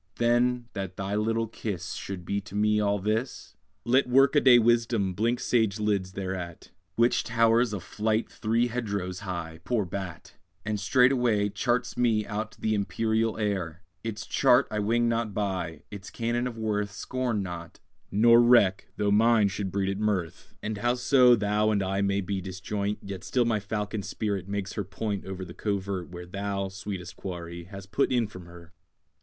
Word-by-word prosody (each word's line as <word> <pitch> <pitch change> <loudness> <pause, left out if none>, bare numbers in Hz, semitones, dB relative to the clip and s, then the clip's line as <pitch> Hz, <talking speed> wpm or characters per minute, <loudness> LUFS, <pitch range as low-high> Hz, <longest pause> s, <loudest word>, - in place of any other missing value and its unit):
Then, 120 +1 +2
that 95 -2 -5
thy 95 +1 -3
little 115 +2 +1
kiss 95 -5 -5
Should 95 -3 -6
be 100 +2 -1
to 100 0 -11
me 105 +1 +3
all 100 -1 +2
this, 110 +6 -3 0.3
Let 125 +2 +3
workaday 135 0 +6
wisdom 115 -4 +2
blink 115 +5 0
sage 110 -4 +1
lids 100 -3 0
thereat; 95 -3 -5 0.2
Which 120 +1 +3
towers 115 0 +3
a 105 - -3
flight 110 +4 -1
three 115 +1 0
hedgerows 100 -7 -3
high, 85 -4 -5
poor 115 -2 0
bat! 90 -1 -7 0.3
And 105 -1 -1
straightway 120 -1 +3
charts 120 +4 -1
me 115 -3 +2
out 105 +1 -4
the 110 - 0
empyreal 110 +2 0
air. 95 -5 -2 0.2
Its 110 -1 -4
chart 130 0 +4
I 105 - -1
wing 115 +3 +2
not 115 -3 -1
by, 90 -6 -2
its 100 -3 -8
canon 120 +1 -1
of 120 -2 -7
worth 105 -2 -1
Scorn 120 -1 -2
not, 85 -2 -7 0.3
nor 115 +3 +6
reck 120 -6 +4
though 105 -1 +1
mine 110 0 +4
should 95 0 -4
breed 95 0 0
it 100 +1 -2
mirth: 100 -6 -2
And 105 -1 -3
howso 125 +2 +5
thou 105 0 +1
and 100 -2 +1
I 95 +1 -1
may 100 0 +1
be 95 0 -3
disjoint, 100 +2 -3
Yet 95 -2 -7
still 120 +5 +1
my 115 -2 +1
falcon 105 +1 -3
spirit 100 -2 -3
makes 100 -1 -3
her 105 - -2
point 100 +2 -4
Over 95 -1 -6
the 85 - -10
covert 100 -3 -3
where 90 0 -8
Thou, 100 +1 -3
sweetest 95 -2 -6
quarry, 85 -2 -6
hast 95 0 -11
put 140 - +1
in 120 -2 +2
from 95 -4 -11
her! 85 +1 -14
105 Hz, 170 wpm, -27 LUFS, 95-115 Hz, 0.3 s, workaday